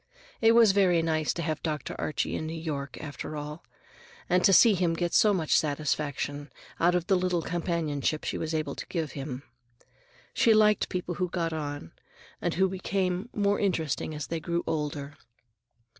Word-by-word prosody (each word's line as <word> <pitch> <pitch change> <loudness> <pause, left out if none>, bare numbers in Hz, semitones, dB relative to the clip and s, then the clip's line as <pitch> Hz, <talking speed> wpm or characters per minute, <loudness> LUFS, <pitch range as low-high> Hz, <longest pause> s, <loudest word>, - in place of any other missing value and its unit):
It 225 0 +6
was 230 -3 +7
very 185 -4 +3
nice 155 -2 +1
to 170 - -3
have 155 -1 -2
Dr. 155 -4 -3
Archie 155 - -1
in 155 - -3
New 165 +1 -5
York, 145 -4 -4
after 150 +1 -6
all, 150 +2 -7 0.6
and 180 0 +2
to 200 - +6
see 220 +3 +7
him 175 -3 +1
get 175 0 -2
so 215 - +5
much 170 -6 +1
satisfaction 145 -1 -1 0.3
out 175 +1 +3
of 175 -1 0
the 195 +1 +3
little 180 -2 0
companionship 160 -4 -1
she - - -3
was 160 0 -2
able 155 -1 -2
to - - -7
give 160 -4 -3
him. 135 -2 -6 0.9
She 225 -2 +4
liked 210 -1 +4
people 180 -1 -3
who 180 - +1
got 165 -2 -2
on, 145 - -5 0.5
and - - -1
who 190 +2 +3
became 185 +2 -2
more 205 -1 +1
interesting 160 -5 -1
as 150 -2 -4
they 165 +5 -3
grew 170 +2 -2
older. 145 -2 -3
165 Hz, 175 wpm, -28 LUFS, 150-185 Hz, 0.9 s, was